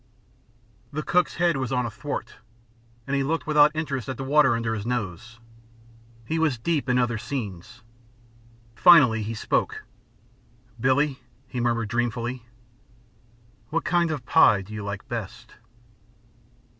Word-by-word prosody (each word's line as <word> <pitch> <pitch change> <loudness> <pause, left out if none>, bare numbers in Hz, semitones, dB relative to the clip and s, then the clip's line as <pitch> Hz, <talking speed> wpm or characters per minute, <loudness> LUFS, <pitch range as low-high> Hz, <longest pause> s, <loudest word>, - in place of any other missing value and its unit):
The 155 +1 -4
cook's 180 +2 +1
head 170 -3 +2
was 130 -2 -3
on 125 -1 0
a 115 - -4
thwart, 140 +6 -6 0.7
and 140 - -2
he 140 - +1
looked 160 +4 -1
without 150 -1 +5
interest 140 -5 -3
at 130 - -4
the 135 - -5
water 135 -2 +4
under 115 -1 -2
his 105 -2 -4
nose. 115 -1 -4 0.9
He 160 +7 -2
was 155 -6 +1
deep 145 +2 -1
in 125 - +3
other 120 -2 0
scenes. 110 -3 -6 0.9
Finally 135 -11 +6
he 110 +2 -4
spoke. - - -1 1.0
"Billie," 135 +3 +1 0.3
he 125 - -5
murmured, 115 -2 0
dreamfully, 120 +1 -2 1.3
"what 165 +1 -2
kind 175 -1 +2
of 145 -6 -4
pie 100 -3 +5
do 105 +3 -12
you 105 -1 -5
like 100 0 -6
best?" - - -7
125 Hz, 140 wpm, -25 LUFS, 115-150 Hz, 1.3 s, Finally